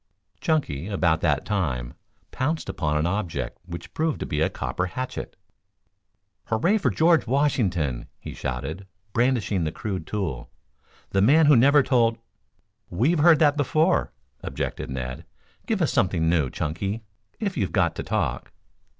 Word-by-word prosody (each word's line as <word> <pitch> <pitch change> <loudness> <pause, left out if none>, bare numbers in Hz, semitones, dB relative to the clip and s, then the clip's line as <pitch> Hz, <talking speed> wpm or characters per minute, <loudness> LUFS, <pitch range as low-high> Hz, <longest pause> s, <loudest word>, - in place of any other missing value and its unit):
Chunky, 95 - -1
about 85 -6 +1
that 70 -4 +1
time, 65 - -2 0.4
pounced 155 +5 -2
upon 75 -3 -1
an 75 - +1
object 90 -1 -2
which 85 -1 -8
proved 160 -1 -1
to - - -1
be 75 - -2
a - - +3
copper 90 - -3
hatchet. 130 +8 -5 1.1
"Hurray 170 - +2
for - - +2
George 165 -3 +3
Washington!" 95 - 0
he - - -8
shouted, 70 +9 -5 0.3
brandishing 120 -6 +1
the 80 - -1
crude 95 -2 -5
tool. 80 -13 -3 0.6
"The 95 - +2
man 150 +10 +6
who 145 -1 +7
never 140 +4 +6
told 120 -3 +2 0.4
" - - -45
"We've 155 +8 +3
heard 165 +1 +7
that 150 -1 +3
before," 155 +5 +2 0.3
objected - - -4
Ned. 65 +3 -5 0.4
"Give 215 -6 +1
us 155 - 0
something 90 -4 +1
new, 80 -5 +2
Chunky, 95 - -3 0.4
if 200 -3 -2
you've 100 -8 -1
got - - +1
to - - -2
talk." - - -2
100 Hz, 150 wpm, -25 LUFS, -, 1.1 s, who